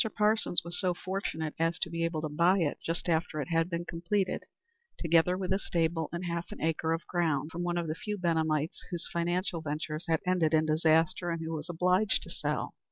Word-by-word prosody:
Parsons 210 -3 +3
was 170 +1 +1
so 180 -2 +2
fortunate 175 -5 -3
as 165 0 +1
to - - -1
be 165 0 -1
able 165 -2 -1
to - - 0
buy 170 +6 +4
it 165 -6 0
just 165 +2 -2
after 165 -2 0
it 140 - -3
had 165 0 +2
been 170 -1 -3
completed, 180 +4 -1 0.6
together 170 +2 +3
with 190 0 -1
a 190 - +1
stable 165 -3 0
and 170 +2 -4
half 170 0 -3
an - - -7
acre 160 0 0
of 165 -1 -1
ground, 160 -4 0
from 170 - -4
one 175 0 -1
of 170 - 0
the 155 - -1
few 210 +6 -4
Benhamites 160 -3 0
whose 175 -2 -3
financial 175 0 0
ventures 155 +1 -4
had 160 -1 +2
ended 175 -4 +3
in 155 0 +3
disaster, 160 +2 +3
and 165 -1 -2
who 160 0 -3
was 155 +1 -5
obliged 180 +4 +2
to - - -8
sell. - - -2
170 Hz, 215 wpm, -30 LUFS, 160-175 Hz, 0.6 s, buy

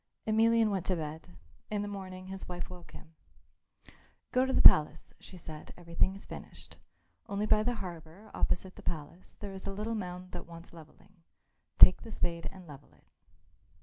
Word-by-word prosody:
Emelian 225 0 +4
went 190 -3 -2
to 185 - +1
bed. 155 -1 -6 0.4
In 210 -1 -1
the - - -4
morning 185 -2 -7
his 190 0 -7
wife 175 0 -6
woke 175 -2 -12
him. 160 - -13 1.2
"Go 255 +1 +3
to - - 0
the - - +3
palace," 150 0 +7
she 185 - -12
said; 155 -3 -10
"everything 175 +2 0
is 195 - -11
finished. - - -11 0.5
Only 200 +1 -1
by 215 0 +4
the 240 +2 0
harbour, 170 +4 -10
opposite 185 +1 -1
the - - -10
palace, 165 +3 -6
there 200 -2 -6
is 190 +1 -8
a - - -2
little 210 +3 -3
mound 180 -3 -5
that 175 -2 -7
wants 170 0 -12
levelling; 170 +3 -16 0.6
take 185 - +9
the 225 - -10
spade 170 -4 -2
and 190 -2 -13
level 145 -3 -13
it." - - -28
185 Hz, 180 wpm, -31 LUFS, 170-205 Hz, 1.2 s, take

